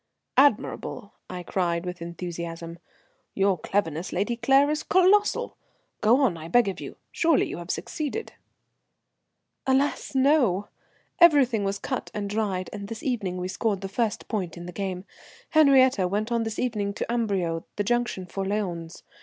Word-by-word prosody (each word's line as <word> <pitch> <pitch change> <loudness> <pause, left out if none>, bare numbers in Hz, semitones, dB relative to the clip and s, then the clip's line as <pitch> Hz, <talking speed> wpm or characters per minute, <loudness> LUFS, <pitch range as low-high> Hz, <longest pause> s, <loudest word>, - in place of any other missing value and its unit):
"Admirable!" 240 -5 +1 0.2
I 180 -1 -6
cried, 170 -1 -1
with 180 -1 -6
enthusiasm. 170 -1 -6 0.6
"Your 195 -1 +3
cleverness, 165 -3 -1
Lady 205 +6 -1
Claire, 270 +5 +4
is 305 - -1
colossal. 405 +2 +3 0.4
Go 235 +6 +4
on, 230 -11 +2
I 160 0 -8
beg 235 +5 +4
of 190 - -6
you. - - -7 0.2
Surely 330 -3 +3
you - - -6
have 175 0 -9
succeeded?" 310 - -4 1.3
"Alas! 270 +1 +1
no. 260 - +3 0.5
Everything 275 - +5
was 195 0 -1
cut 260 +4 -4
and 205 -1 -2
dried 200 -4 -1
and 200 -1 -6
this 225 +1 -7
evening 210 -9 -2
we 180 0 -3
scored 200 +1 -1
the 195 - -4
first 215 +2 -2
point 185 -7 -3
in 175 - -8
the 180 - -7
game. 185 0 -4 0.5
Henriette 260 - +5
went 215 +4 -1
on 230 -1 +1
this 225 0 -4
evening 210 -5 -1
to - - -2
Amberieu, 195 -8 -1
the 205 - 0
junction 240 -4 -1
for 195 +2 -4
Lyons. 185 -5 -3
205 Hz, 155 wpm, -26 LUFS, 180-250 Hz, 1.3 s, Everything